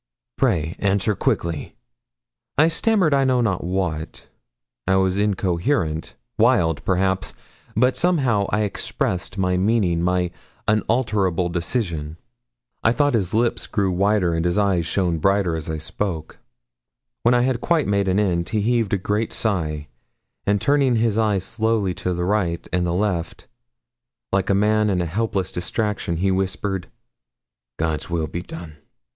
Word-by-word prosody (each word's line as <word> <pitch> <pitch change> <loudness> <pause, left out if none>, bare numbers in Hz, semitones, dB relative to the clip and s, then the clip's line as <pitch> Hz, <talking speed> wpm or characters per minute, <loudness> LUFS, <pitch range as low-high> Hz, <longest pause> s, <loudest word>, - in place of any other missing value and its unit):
Pray 80 +2 +1
answer 100 +1 +1
quickly.' 85 -5 -2 0.8
I 155 +3 +5
stammered 185 -2 +2
I 135 -1 +4
know 130 -1 +2
not 105 -7 0
what. 85 -3 -3 0.6
I 95 - +3
was 95 0 +2
incoherent 90 - 0 0.2
wild, 80 -3 +3
perhaps; 95 0 0 0.4
but 125 +4 +3
somehow 130 - +2
I 105 - +1
expressed 100 -2 -2
my 90 -1 +1
meaning 95 -4 +2
my 90 0 +1 0.4
unalterable 105 -5 +1
decision. 85 -3 -2 0.7
I 115 - +5
thought 145 +1 +2
his 100 -4 0
lips 120 +1 +1
grew 100 -3 0
whiter 95 -1 +2
and 80 0 0
his 85 +2 +1
eyes 95 -5 +2
shone 85 -2 0
brighter 95 -1 +2
as 80 -1 -5
I 80 - -2
spoke. 80 0 -4 0.8
When 120 +1 +4
I 120 - +4
had 125 -1 0
quite 170 -3 +2
made 100 -1 +1
an 95 +2 +2
end, 85 -5 0
he 110 -2 0
heaved 115 -2 +1
a - - 0
great 105 +4 -1
sigh, 80 -8 -1 0.6
and 100 0 +3
turning 140 0 +3
his 115 -1 +1
eyes 105 -4 +1
slowly 110 -3 0
to 90 - -1
the 90 0 -1
right 90 -4 0
and 90 -1 +1
the - - 0
left, 90 -4 -2 0.9
like 95 -1 +1
a 100 - +4
man 105 +1 +3
in 95 -2 +1
a 90 - 0
helpless 95 +1 -1
distraction, 95 -1 -2
he 95 +3 +1
whispered 95 0 -2 0.9
'God's 80 0 -2
will 85 -2 0
be 85 +3 -5
done.' 80 -3 -9
95 Hz, 150 wpm, -22 LUFS, 85-110 Hz, 0.9 s, I